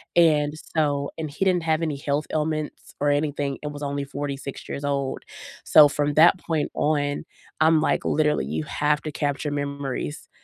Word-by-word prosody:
and, 150 -4 +4 0.2
so 145 -2 +1
and 155 -1 -4
he 145 +7 -3
didn't 180 -3 +2
have 160 0 +1
any 155 -3 -1
health 145 +2 -1
ailments 155 -1 -3
or 145 - +3
anything, 145 -1 0
it 150 - -5
was 145 0 -8
only 140 0 -2
46 140 -1 -6
years 140 - -4
old, 140 -1 -2 0.4
so 150 -1 +8
from 145 0 0
that 170 +4 +7
point 160 -4 -2
on, 145 -1 0 0.4
I'm 160 0 +5
like, - - 0
literally, 150 - +1
you 80 +3 -3
have 150 - 0
to 155 - -4
capture 145 0 -2
memories 140 0 -4
145 Hz, 175 wpm, -24 LUFS, 140-155 Hz, 0.4 s, so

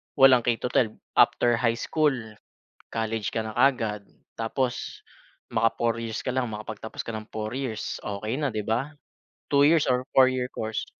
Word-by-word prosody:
walang 130 -2 +7
K-12 120 -1 +1 0.2
after 120 -1 +4
high 115 -2 +2
school, 150 +3 +1 0.8
college 110 -2 -2
ka 110 - -1
na 110 -1 -6
kaagad. 110 -7 +2 0.3
Tapos 120 +2 -2 0.5
maka 115 -1 +2
4 115 -1 +2
years 115 -1 -4
ka - - -5
lang 125 -4 0
makapagtapos 110 +1 -7
ka 115 -1 -4
ng 110 - -6
4 110 +3 -4
years 125 -6 -3
okey 105 +4 -3
na 145 -5 -1
di 110 - -2
ba? 120 +8 -1 0.6
2 140 0 +6
years 160 -1 +4
or 125 +1 0
4 130 -1 +7
year 125 -1 -1
course. 110 0 -3
115 Hz, 165 wpm, -26 LUFS, 110-130 Hz, 0.8 s, walang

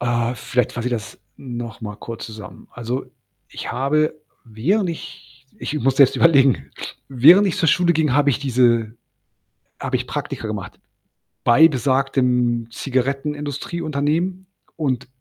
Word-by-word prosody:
Äh, 120 0 0
vielleicht 125 -1 -1
fasse 120 0 -3
ich 125 - -1
das 110 -3 -6 0.2
nochmal 115 -5 -7
kurz 115 -1 -7
zusammen. 110 -1 -11
Also, 120 +2 -4 0.4
ich - - -6
habe 150 +5 +1 0.3
während 155 - 0
ich 130 -5 -10
ich - - -5
muss 130 +2 +1
jetzt 140 -2 +6
überlegen, 140 -6 +4 0.4
während 160 +11 +6
ich 190 - -2
zur 175 -5 +1
Schule 175 +1 +4
ging, 155 -4 +1
habe 145 +1 +3
ich 135 - 0
diese 120 -5 +2 0.9
habe - - -2
ich - - -2
Praktika - - -4
gemacht - - -6 0.6
bei 145 +7 +7
besagtem 125 -4 +1
Zigarettenindustrieunternehmen 150 +6 -2 0.3
und 130 -6 -2
135 Hz, 130 wpm, -21 LUFS, 120-150 Hz, 0.9 s, bei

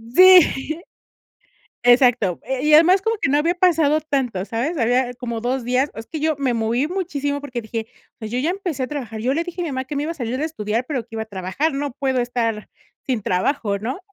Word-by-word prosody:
Sí. 350 -3 +6 1.0
Exacto. 245 -7 +4
Eh, 265 0 -3
y 300 0 +4
además 360 +5 +6
como 450 +2 0
que 280 - +1
no 285 - +3
había 335 +4 +1
pasado 320 -5 +3
tanto, 265 -11 -2
¿sabes? 255 - -2
Había 245 +1 +1
como 235 -2 -5
2 250 +1 -2
días, 255 +4 +1
es 225 - -7
que 315 - -6
yo 310 -1 +1
me 265 -3 0
moví 230 +5 0
muchísimo 290 -6 -2
porque 255 -4 -5
dije: 220 0 -5 0.3
"O - - -66
sea, 220 - -5
yo 245 - -2
ya 295 +6 0
empecé 355 -8 -3
a - - -3
trabajar. 245 -7 -6
Yo 255 +5 0
le 330 - 0
dije 350 0 -5
a - - -2
mi 320 - -3
mamá 260 0 -3
que 285 +2 -6
me 285 - -1
iba 330 - -2
a - - -12
salir 250 -3 -3
de 295 - -1
estudiar, 230 -6 -2
pero 265 -6 -2
que 230 - -28
iba 220 - -2
a - - -5
trabajar, 200 - -2
no 285 -1 -3
puedo 265 -1 -1
estar 230 -3 -2 0.4
sin 250 -5 -1
trabajo", 200 +2 0
¿no? 240 - -4
265 Hz, 235 wpm, -21 LUFS, 235-310 Hz, 1.0 s, Sí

